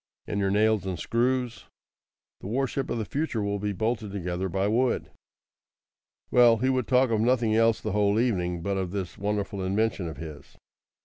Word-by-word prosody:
"And 100 - -3
your 100 -1 +1
nails 105 -1 +2
and 95 -2 -2
screws?" 125 +3 -1 0.7
"The - - -8
warship 135 +4 -1
of - - -1
the 110 - -2
future 140 -4 -2
will 100 0 -1
be 105 +1 -1
bolted 110 +1 -2
together 90 -1 -3
by 95 +2 0
wood." 120 +4 +1 1.2
Well, 120 -2 +6
he 130 +4 +1
would 130 -2 0
talk 130 -1 +3
of 110 -1 +2
nothing 115 -2 +2
else 115 0 +3
the 110 - -3
whole 105 +1 +2
evening 90 -8 0
but 100 +1 -1
of 95 -2 -2
this 95 -1 -5
wonderful 100 -1 -2
invention 100 -1 0
of 80 -4 -7
his. 75 -2 -10
105 Hz, 180 wpm, -27 LUFS, 95-115 Hz, 1.2 s, Well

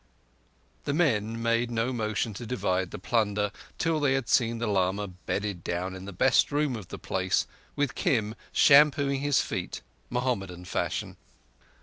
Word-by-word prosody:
The 145 - 0
men 115 -9 +1
made 115 +1 +1
no 120 +2 -1
motion 110 -1 -1
to 120 +5 -7
divide 95 -6 0
the - - -7
plunder 105 0 0 0.3
till 165 -1 +1
they 145 -3 +2
had 135 -3 -2
seen 115 -1 +2
the 115 - -2
lama 100 -1 +1
bedded 95 0 -4
down 90 +2 -3
in 95 0 -8
the 100 - -6
best 90 - +3
room 145 -3 +1
of 105 -6 -7
the - - -7
place, 95 -2 0 0.3
with 145 -1 0
Kim 110 -5 0 0.2
shampooing 140 -1 +5
his 145 -1 +2
feet, - - -4 0.3
Mohammedan 95 -8 -2
fashion. - - -2
115 Hz, 155 wpm, -28 LUFS, 95-130 Hz, 0.3 s, shampooing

